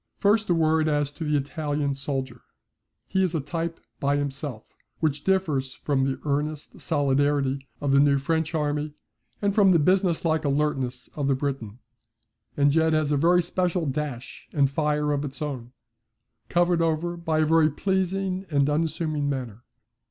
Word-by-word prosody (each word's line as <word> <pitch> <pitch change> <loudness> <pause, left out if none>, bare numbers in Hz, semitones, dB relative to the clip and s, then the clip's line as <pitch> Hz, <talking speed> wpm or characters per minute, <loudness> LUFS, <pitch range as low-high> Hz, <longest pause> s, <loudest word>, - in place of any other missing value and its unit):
First 210 +1 +2
a 175 - +4
word 160 -1 +2
as 145 -2 +1
to 160 - -7
the 150 -1 +1
Italian 145 0 -2
soldier. 135 -3 -4 0.7
He 190 - +1
is 180 -3 +1
a - - +1
type 165 +3 -4 0.2
by 140 +1 +1
himself 140 -4 -4 0.3
which 150 -2 0
differs 155 -9 0
from 135 -2 0
the 135 -1 -2
earnest 150 +1 -3
solidarity 140 -2 +1
of 140 - -1
the 140 - +5
new 140 0 +4
French 160 +3 -1
army, 150 -1 -1 0.5
and 200 -1 +2
from 195 -3 +5
the - - +5
businesslike 170 -1 +2
alertness 140 -4 -1
of 145 -2 -2
the 135 - +3
Briton, 130 -6 -4 0.8
and 140 0 +4
yet 160 0 +3
has 155 -1 +1
a - - +3
very 170 +5 +4
special 180 0 0
dash 140 -3 -5
and 140 -3 +2
fire 150 0 0
of 145 0 -1
its 135 -2 -4
own, 130 -6 -5 0.8
covered 175 -1 +2
over 165 +1 0
by 160 -2 0
a - - +3
very 160 0 +4
pleasing 190 +3 -1
and 140 -3 +2
unassuming 155 -1 -1
manner. 125 -5 -4
150 Hz, 160 wpm, -25 LUFS, 140-165 Hz, 0.8 s, the